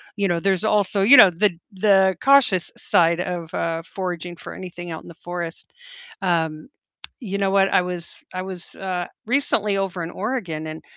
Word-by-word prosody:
you 200 -1 0
know, 170 -2 0
there's 190 +1 0
also, 205 -2 +1
you 255 +6 +8
know, 205 -5 +10
the 180 +3 +1 0.2
the 190 -1 +3
cautious 265 -10 +4
side 170 0 +2
of, 175 -2 -4
uh, 165 0 -2
foraging 175 -2 -5
for - - -9
anything 175 -1 -8
out 160 - -6
in - - -14
the 170 - -10
forest. 175 0 -7 0.5
Um, 160 -2 -1 0.5
you 200 -3 -3
know 195 -1 +1
what? 195 0 +4
I - - +5
was 180 -1 -7
I 185 - -3
was, 185 -2 -8
uh, 180 -2 -3 0.2
recently 215 -6 +1
over 185 -3 -2
in 165 - -5
Oregon 185 -8 -3
and, 155 +1 -8
185 Hz, 180 wpm, -22 LUFS, 170-195 Hz, 0.5 s, know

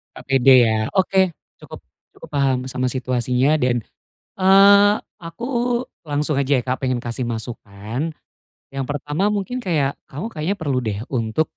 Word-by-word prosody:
Gak - - -11
pede 135 0 +4 0.2
ya. 110 0 -1
Oke, 190 -1 +2 0.2
cukup - - -12 0.3
cukup - - -13
paham 140 -2 +1
sama 130 -1 -2
situasinya 130 +2 +1
dan, 125 -4 +1 0.6
eee, 200 +2 +6 0.3
aku 170 +8 -7 0.6
langsung 150 0 -1
aja 140 0 +2
ya, 125 - -2
Kak, 130 +1 -2
pengen 130 -2 0
kasih 120 +2 -5
masukan. 115 +3 -5 0.6
Yang 135 -1 -4
pertama 145 +8 -1
mungkin 210 +5 -3
kayak, 150 -7 0
kamu 145 +10 -6
kayaknya 180 +1 -3
perlu 140 -7 -1
deh 105 -2 -3
untuk 115 +2 0
135 Hz, 145 wpm, -21 LUFS, 125-165 Hz, 0.6 s, eee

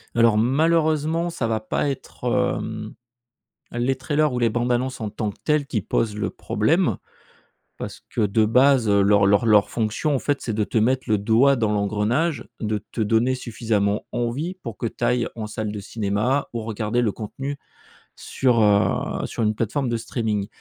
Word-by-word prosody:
Alors 115 -2 +4
malheureusement 160 +5 +2
ça 130 -8 -2
va 110 -1 -1
pas 110 +6 -1
être, 135 -2 -7 0.3
hem, 110 -1 -6 0.8
les 120 +3 0
trailers 145 +2 0
ou 125 - -1
les 115 -1 +3
bandes 120 +2 -1
annonces 125 +1 -1
en 105 -2 -4
tant 105 0 -2
que 100 - -10
tels 150 -2 +1
qui 110 -6 -1
posent 105 +3 -1
le 105 -3 -2
problème. - - +1 0.8
Parce - - -7
que - - -2
de 105 +1 +2
base, 125 +1 +4
heu, 100 0 +4
leur 100 0 +4
leur 100 +3 +3
leur 105 -3 +5
fonction 115 +7 -1
en - - 0
fait 145 +2 -1
c'est 115 - -3
de 105 0 0
te 110 - 0
mettre 130 +4 +1
le 105 -3 +2
doigt 115 +7 +4
dans 110 -4 0
l'engrenage. 105 +10 0
De 105 -2 -2
te 115 - -3
donner 115 +4 +2
suffisamment 110 -4 -1
envie 135 +10 -2
pour 115 - -8
que 115 - -2
tu - - -7
ailles 125 -1 +2
en 110 -2 -4
salle 105 0 -4
de 105 - -5
cinéma 105 +6 -1
ou 115 - -2
regarder 110 +2 -1
le 115 -4 +1
contenu 135 +7 -6 0.6
sur, 125 -3 +1
heu, 105 0 +2
sur - - -3
une 110 0 +2
plateforme 120 +5 -1
de 120 - 0
streaming. 110 -3 -2
115 Hz, 185 wpm, -23 LUFS, 105-130 Hz, 0.8 s, leur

